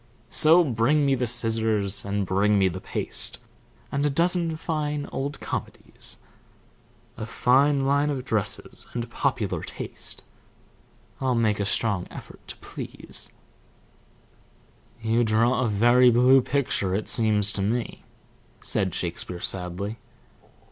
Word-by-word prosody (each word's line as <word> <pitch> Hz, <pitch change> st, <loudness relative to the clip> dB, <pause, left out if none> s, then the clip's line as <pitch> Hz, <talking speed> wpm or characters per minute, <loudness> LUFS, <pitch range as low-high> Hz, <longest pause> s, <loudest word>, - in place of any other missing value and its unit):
So 165 Hz, +3 st, +6 dB
bring 135 Hz, +2 st, +2 dB
me 135 Hz, -, +3 dB
the 125 Hz, -2 st, 0 dB
scissors, 110 Hz, -3 st, +1 dB
And 100 Hz, 0 st, -1 dB
bring 100 Hz, +3 st, +2 dB
me 95 Hz, -1 st, +4 dB
the 85 Hz, -, -6 dB
paste, -, -, -3 dB, 0.5 s
And 140 Hz, +1 st, -1 dB
a 145 Hz, -, +3 dB
dozen 170 Hz, +2 st, +1 dB
fine 150 Hz, -3 st, -2 dB
old 140 Hz, +2 st, -3 dB
comedies; -, -, -5 dB, 1.0 s
A 110 Hz, -, -5 dB
fine 135 Hz, +4 st, +3 dB
line 140 Hz, +2 st, +2 dB
of 135 Hz, -3 st, -3 dB
dresses, 110 Hz, -6 st, -3 dB
And 120 Hz, -1 st, -2 dB
popular -, -, -1 dB
taste -, -, -6 dB, 1.0 s
I'll 130 Hz, -2 st, 0 dB
make 110 Hz, -3 st, +1 dB
a 100 Hz, -, 0 dB
strong 100 Hz, -4 st, 0 dB
effort -, -, -11 dB
to -, -, -5 dB
please. -, -, -6 dB, 1.7 s
"You 115 Hz, +2 st, +2 dB
draw 115 Hz, +3 st, +2 dB
a 125 Hz, -, +1 dB
very 120 Hz, +4 st, +5 dB
blue 125 Hz, +3 st, +5 dB
picture, 120 Hz, -8 st, 0 dB
it 105 Hz, -, -2 dB
seems 105 Hz, -3 st, +4 dB
to 100 Hz, -, -2 dB
me," 115 Hz, +4 st, -2 dB, 0.6 s
said -, -, 0 dB
Shakespeare, 90 Hz, -, -3 dB
sadly. 95 Hz, +4 st, 0 dB
120 Hz, 125 wpm, -25 LUFS, 105-140 Hz, 1.7 s, So